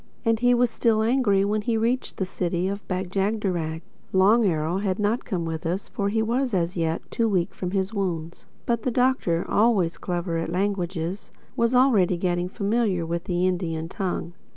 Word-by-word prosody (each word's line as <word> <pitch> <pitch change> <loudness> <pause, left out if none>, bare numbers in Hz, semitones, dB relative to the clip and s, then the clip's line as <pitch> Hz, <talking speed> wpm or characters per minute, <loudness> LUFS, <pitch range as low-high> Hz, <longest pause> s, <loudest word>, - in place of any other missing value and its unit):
And 225 -1 +2
he 245 +1 +4
was 245 -1 +2
still 225 -1 +2
angry 220 -5 +3
when 210 +1 0
he 225 +1 0
reached 235 +3 -1
the 190 - 0
City 180 -1 -1
of 200 +1 -5
Bag 185 -1 -3
jagderag. 190 -5 -1 0.3
Long 205 +5 +5
Arrow 165 +1 0
had 195 -2 -1
not 210 +4 0
come 180 -7 -2
with 160 0 -4
us 180 +4 -3
for 200 -1 -1
he 220 +1 +1
was 245 0 0
as 175 0 0
yet 165 -1 -1
too 230 -1 +1
weak 185 -2 0
from 185 -1 -4
his 190 +2 -1
wound. 170 -5 -3 0.2
But 235 -1 0
the 255 - -1
Doctor—always 220 -5 +2
clever 175 -2 -2
at 165 - -3
languages—was 195 +5 -2
already 215 -9 +4
getting 175 0 -1
familiar 200 -3 0
with 170 +2 -3
the 180 0 0
Indian 170 -3 -1
tongue. 180 -4 -3
190 Hz, 175 wpm, -25 LUFS, 175-220 Hz, 0.3 s, Long